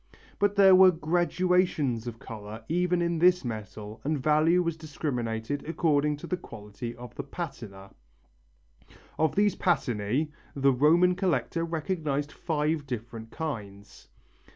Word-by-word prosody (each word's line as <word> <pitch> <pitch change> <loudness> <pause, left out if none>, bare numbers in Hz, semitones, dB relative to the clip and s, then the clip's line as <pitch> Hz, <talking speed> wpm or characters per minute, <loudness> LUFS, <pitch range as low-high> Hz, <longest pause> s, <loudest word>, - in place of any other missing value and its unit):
But 205 0 +2
there 195 -2 +7
were 185 0 +8
gradations 175 -6 +1
of 115 -1 -5
colour 110 0 -9
even 180 +1 +1
in 170 -1 0
this 180 -2 +4
metal 110 -1 -7
and 150 +2 0
value 155 +5 +3
was 170 -2 -1
discriminated 140 -5 -3
according 150 -3 +1
to - - -9
the 180 - -2
quality 115 - -8
of 120 +1 -10
the - - -5
patina. 115 - -8 1.3
Of 160 - +2
these 205 0 +3
patinæ 130 - 0 0.2
the 140 -1 +3
Roman 165 +7 +4
collector 180 -2 -1
recognized 155 -3 -2
five 150 -2 -1
different 115 -2 -6
kinds. 105 -11 -7
150 Hz, 130 wpm, -28 LUFS, 115-170 Hz, 1.3 s, were